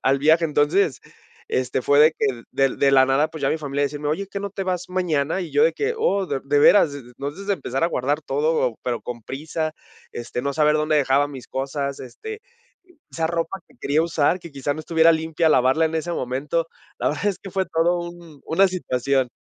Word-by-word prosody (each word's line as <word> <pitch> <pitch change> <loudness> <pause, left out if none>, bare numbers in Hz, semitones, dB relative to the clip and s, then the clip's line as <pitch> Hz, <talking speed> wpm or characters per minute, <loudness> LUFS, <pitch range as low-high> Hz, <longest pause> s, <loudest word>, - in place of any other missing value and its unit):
al 135 +1 +3
viaje. 160 +4 +4
Entonces, 150 - +2 0.5
este, 130 0 -1
fue 145 0 +4
de 155 +1 +7
que 125 -4 -1
del 135 -1 +1
de 140 - +5
la 130 -1 +6
nada, 140 +4 +2
pues, 160 -3 -9
ya 135 - +2
mi 160 - 0
familia 145 -1 -1
decirme, 145 +1 -3
oye, 165 +7 -1
¿qué 200 - -5
no 200 0 -4
te 195 0 -4
vas 180 -1 -2
mañana? 175 -3 0
Y 175 - -6
yo 440 - +4
de 485 - +4
que, 440 +2 -1
oh, 200 - +1
¿de 135 - -2
de 145 +1 +2
veras?, 150 0 +6
e - - -5
entonces 140 +9 -8
a - - +3
empezar 135 -4 -2
a - - +4
guardar 145 -1 -1
todo, 145 -4 0
pero 120 -2 -2
con 120 -2 -7
prisa, 155 +6 -4 0.4
este, 120 +1 -5
no 140 - -1
saber 150 +1 +3
dónde 155 0 +1
dejaba 140 0 +2
mis 135 -3 -9
cosas, 140 +1 -3
este, 430 - -8 0.7
esa 165 -1 -1
ropa 170 +3 -2
que - - -24
quería 145 +3 +1
usar, 165 0 +1
que 170 -2 -11
quizá 140 +1 -2
no 155 - -6
estuviera 165 0 +4
limpia, 160 0 +1
lavarla 135 +3 +3
en 160 - -5
ese 170 +2 -3
momento, 140 +4 -2 0.3
la - - +1
verdad 155 +7 -3
es 200 -3 0
que 195 - -10
fue 190 +1 0
todo 170 +2 +1
un 170 -4 -10
una 190 +4 +3
situación. 135 -7 0
155 Hz, 220 wpm, -22 LUFS, 135-170 Hz, 0.7 s, de